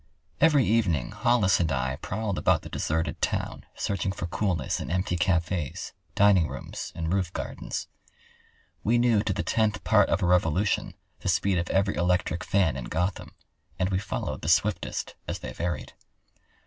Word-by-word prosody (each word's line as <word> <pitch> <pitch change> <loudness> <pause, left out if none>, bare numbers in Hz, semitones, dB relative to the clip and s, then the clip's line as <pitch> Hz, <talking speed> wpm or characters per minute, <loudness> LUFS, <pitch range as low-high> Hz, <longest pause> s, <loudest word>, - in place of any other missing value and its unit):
Every 150 -5 +5
evening 90 - +1
Hollis 115 -6 +3
and 80 -3 +1
I 65 -1 -1
prowled 100 -1 -3
about - - +2
the - - -8
deserted 80 +1 -2
town - - -2
searching 100 -1 -1
for 95 - -4
coolness 90 0 -1
in - - -5
empty 90 +1 0
cafes, 85 -3 -1 0.2
dining 100 -5 +5
rooms, - - -6
and 80 +1 -2
roofgardens. 95 -2 -3 1.0
We 115 +3 +3
knew 120 -3 +4
to 105 -1 -1
the 85 - -1
tenth 105 +3 +1
part 105 -3 +4
of 95 - +1
a - - +3
revolution 90 +2 +2 0.2
the - - -2
speed 95 -3 +2
of 85 - -3
every 100 +1 +2
electric 90 -1 0
fan 90 -9 +2
in 65 - -5
Gotham, 90 +7 -2 0.4
and 95 +1 0
we 95 - +1
followed 100 - -4
the 75 - -2
swiftest 105 +5 +1
as - - -2
they - - -7
varied. 85 -4 -3
95 Hz, 160 wpm, -27 LUFS, 85-100 Hz, 1.0 s, Every